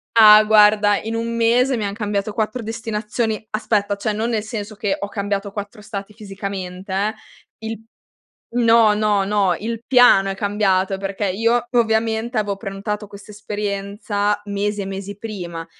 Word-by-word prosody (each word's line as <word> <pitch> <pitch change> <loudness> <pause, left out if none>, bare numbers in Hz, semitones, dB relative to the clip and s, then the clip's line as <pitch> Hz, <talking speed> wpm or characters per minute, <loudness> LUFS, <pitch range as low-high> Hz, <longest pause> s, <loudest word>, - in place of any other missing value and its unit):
Ah, 215 -1 +9
guarda 210 -1 +5
in 225 +1 -4
1 230 0 -2
mese 245 +3 +3
mi 215 - -2
han 200 - -3
cambiato 205 -1 -2
4 220 +3 -2
destinazioni. 220 0 -3
Aspetta 210 -1 0
cioè 215 +2 -2
non 225 +3 -1
nel 220 -3 -1
senso 215 -1 -6
che 205 -1 -1
ho 200 - -3
cambiato 200 -1 -3
4 205 +1 -7
stati 210 -1 -7
fisicamente 195 -3 -6
eh; 205 +3 0 0.5
il 225 0 -6 0.7
no, 230 -2 +5
no, 210 -2 +2
no, 200 -3 +2
il 230 +1 -4
piano 245 -7 +6
è - - -5
cambiato 195 -2 +1
perché 195 +1 -3
io 230 +5 +1
ovviamente 225 0 +1
avevo 200 -2 -2
prenotato 210 +1 -5
questa 200 +1 -13
esperienza 205 0 -2
mesi 205 0 -2
e - - -4
mesi 195 +1 -6
prima 175 -7 -6
210 Hz, 155 wpm, -20 LUFS, 200-220 Hz, 0.7 s, Ah